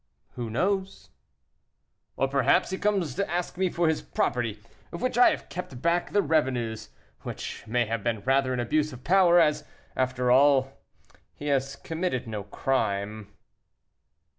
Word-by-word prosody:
"Who 120 -2 -5
knows?" 190 - -2 1.1
"Or - - +2
perhaps - - +2
he 190 - -3
comes 195 -9 0
to 200 - -2
ask 175 0 -2
me 185 0 +1
for 170 -1 0
his 160 -1 +1
property, 120 -4 -1 0.3
of - - -6
which 255 +1 -1
I 245 - +7
have - - -4
kept 175 -9 -7
back 170 +4 +1
the 205 - +2
revenues, 125 -8 0 0.3
which - - -6
may 120 +2 +1
have 115 -1 -3
been 115 -3 -1
rather 135 +1 +2
an 125 - -1
abuse 150 +6 0
of 125 0 -11
power, 175 +2 +5
as, 150 -2 +2 0.3
after 125 -1 0
all, 135 0 +4 0.6
he 145 - -5
has 135 -1 0
committed 165 -5 -3
no 110 -2 -4
crime." 100 -3 -2
135 Hz, 155 wpm, -27 LUFS, 120-175 Hz, 1.1 s, I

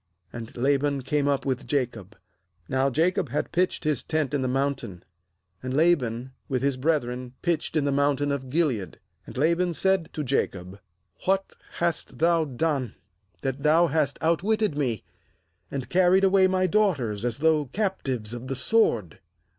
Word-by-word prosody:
^And 115 0 -8
Laban 140 +1 +1
came 145 +2 0
up 140 -1 0
with 130 -1 -2
Jacob. 115 -7 -2 0.5
Now 130 +1 +1
Jacob 180 +8 +1
had - - -2
pitched 180 +1 0
his 150 -5 0
tent 155 -3 -1
in 145 - +1
the 130 - 0
mountain; 135 -8 -2 0.6
and 130 0 -3
Laban 130 -7 +2 0.2
with 130 -2 -1
his 140 -1 +2
brethren 130 -3 -1
pitched 170 -2 -1
in 150 -2 +2
the 140 - +1
mountain 145 0 +1
of 135 -2 -3
Gilead. 130 - 0 0.3
^And - - -9
Laban 170 +4 +2
said 190 -2 +1
to 150 - -3
Jacob: 100 -8 -2 0.5
'What 195 +1 +1 0.2
hast 170 -1 -2
bhou 160 -5 +1
done, 140 -7 0 0.5
that 135 0 -2
thou 155 +4 +5
hast 150 -3 0
outwitted 195 +3 +1
me, 125 -8 -1 0.7
and 135 -3 -4
carried 185 +1 +4
away 190 -1 +5
my 185 0 +1
daughters 155 - +1
as 120 -1 -1
though 155 0 +2
captives 130 - -2
of 120 +1 -7
the 135 - -2
sword? 120 - +1
145 Hz, 155 wpm, -26 LUFS, 130-170 Hz, 0.7 s, thou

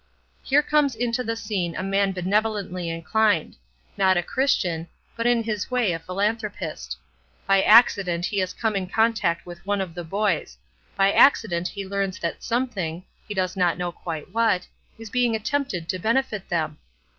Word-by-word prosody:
"Here 290 +2 +3
comes 295 -4 +2
into 240 +2 -1
the 230 -1 -2
scene 200 -7 -3
a 185 - -3
man 195 0 +1
benevolently 190 -1 -1
inclined; 165 +2 +1 0.4
not 190 -1 +3
a 175 - +1
Christian, 175 -10 0 0.3
but 230 0 0
in 240 -1 +3
his 215 -3 -3
way 250 -6 +1
a 165 - -3
philanthropist. 195 - -3 0.5
By 195 0 +4
accident 195 -6 +5
he 200 - -1
has 185 -1 0
come 220 +2 -1
in 190 -2 -1
contact 220 -5 +1
with 175 -1 -10
one 200 +1 -1
of 185 -3 -3
the 175 0 -6
boys; 170 - -1 0.4
by 195 0 +4
accident 180 -11 +4
he 200 -1 -6
learns 195 -1 -2
that 170 - -4
something 195 -9 -2 0.2
he 210 - -5
does 185 0 -1
not 180 -2 +2
know 180 -1 -2
quite 165 +1 -7
what 225 -5 +2 0.3
is 225 -2 -10
being 245 -2 +2
attempted 220 - -2
to 185 - -1
benefit 225 -1 0
them. 155 -3 -1
195 Hz, 170 wpm, -24 LUFS, 175-225 Hz, 0.5 s, accident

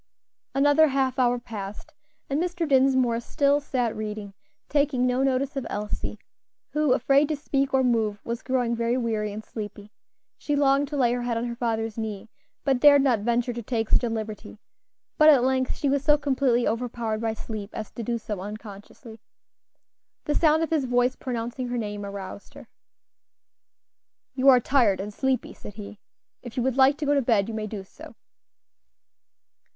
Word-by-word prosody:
Another 290 +3 +5
half 265 -2 0
hour 245 -1 +3
passed, 220 +4 -8 0.3
and 285 +3 -1
Mr. 350 -2 -2
Dinsmore 260 -4 +3
still 280 +4 +1
sat 250 -5 -2
reading, 210 -2 -5 0.3
taking 285 -4 +1
no 250 +1 +1
notice 270 +1 0
of 270 -3 -3
Elsie, 210 +1 -4 0.5
who, 300 -3 +2
afraid 275 +4 +3
to 310 - -1
speak 275 -1 -1
or 265 -1 +3
move, 220 -4 +1
was 235 +1 -4
growing 250 -3 0
very 235 +2 0
weary 220 -4 -1
and 215 +2 -7
sleepy. 210 -1 -8 0.5
She 295 - -1
longed 280 0 +3
to 295 +1 -4
lay 245 -3 +3
her 245 - -2
head 240 -1 -1
on 230 - -2
her 235 -1 -4
father's 225 -2 -2
knee, 220 -1 -5 0.3
but 270 -3 +1
dared 285 0 +7
not 250 -5 +3
venture 240 +3 0
to 235 - -5
take 225 -1 -2
such - - +4
a 240 - 0
liberty; 220 -1 -6 0.6
but 305 0 +8
at 275 -5 +6
length 260 0 +1
she 290 - -2
was 280 0 +1
so 295 0 +5
completely 265 -4 +1
overpowered 230 -1 -2
by 225 -1 -1
sleep 215 -2 -6
as 215 - -6
to - - -7
do 235 +1 -2
so 215 -3 -5
unconsciously. 210 +3 -10 1.1
The 295 - 0
sound 315 +1 +3
of 325 - -3
his 305 -5 +1
voice 245 +1 +1
pronouncing 245 0 -4
her 245 0 -3
name 205 -2 -4
aroused 200 0 -8
her. - - -12 1.7
"You 265 +1 0
are 255 -2 +7
tired 235 -7 +2
and 205 +2 -5
sleepy," 265 +3 -1
said 205 - -11
he; 210 -1 -9 0.4
"if 240 -1 -10
you 245 - +1
would 260 -1 0
like 270 +2 +5
to 305 - -3
go 290 - +2
to 280 - +3
bed 225 -5 +2
you 225 - -5
may 215 -1 -3
do 205 -2 -6
so." 190 - -14
245 Hz, 180 wpm, -25 LUFS, 220-275 Hz, 1.7 s, but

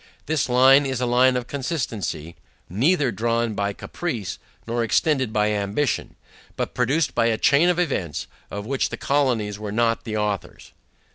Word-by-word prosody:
This 150 -4 0
line 135 +3 +6
is 130 -2 -2
a 125 - 0
line 125 +1 +4
of 125 - -3
consistency; 125 - -4 0.3
neither 135 - +2
drawn 115 +2 0
by 100 0 -1
caprice, 115 - -5 0.3
nor 115 +1 -1
extended 130 +1 +1
by 105 -1 +1
ambition; 105 +7 -1 0.4
but - - -3
produced 130 +2 +1
by 115 -1 +2
a 115 -1 +1
chain 155 +10 +4
of 180 - +1
events, 120 - -1 0.2
of 100 0 -6
which 135 +3 0
the - - -5
colonies 120 -8 0
were 105 -1 -5
not 115 +1 +1
the 110 -1 -3
authors. 105 -2 -3
120 Hz, 160 wpm, -23 LUFS, 105-135 Hz, 0.4 s, line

